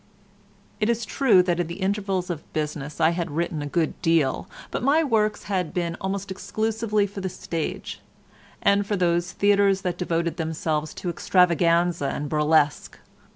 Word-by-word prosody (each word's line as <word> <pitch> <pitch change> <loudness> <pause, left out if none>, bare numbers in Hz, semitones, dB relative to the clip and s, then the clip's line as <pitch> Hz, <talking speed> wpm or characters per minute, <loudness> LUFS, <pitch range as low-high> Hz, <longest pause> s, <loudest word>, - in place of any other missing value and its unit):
It 215 0 +1
is 235 -1 0
true 230 -10 +4
that 175 -1 0
in 175 - 0
the 170 - -6
intervals 195 -2 -1
of 160 -3 -8
business 150 -1 -4
I 160 0 +4
had 170 0 -2
written 160 0 -2
a 145 - -4
good 160 +2 -1
deal, 165 -6 +1 0.2
but - - -2
my 285 +6 +3
works 215 -6 +1
had 185 -5 -2
been 170 -1 -1
almost 195 0 -3
exclusively 215 +1 -1
for 200 0 -7
the 190 - -2
stage, 165 -2 -5 0.6
and 200 0 +4
for 205 - 0
those 175 -1 +1
theatres 200 -1 +3
that 180 -3 -3
devoted 170 -1 -1
themselves 155 -2 -2
to 175 - -3
extravaganza 170 -3 +2
and 145 +2 -3
burlesque. 150 -1 +2
175 Hz, 160 wpm, -24 LUFS, 160-200 Hz, 0.6 s, true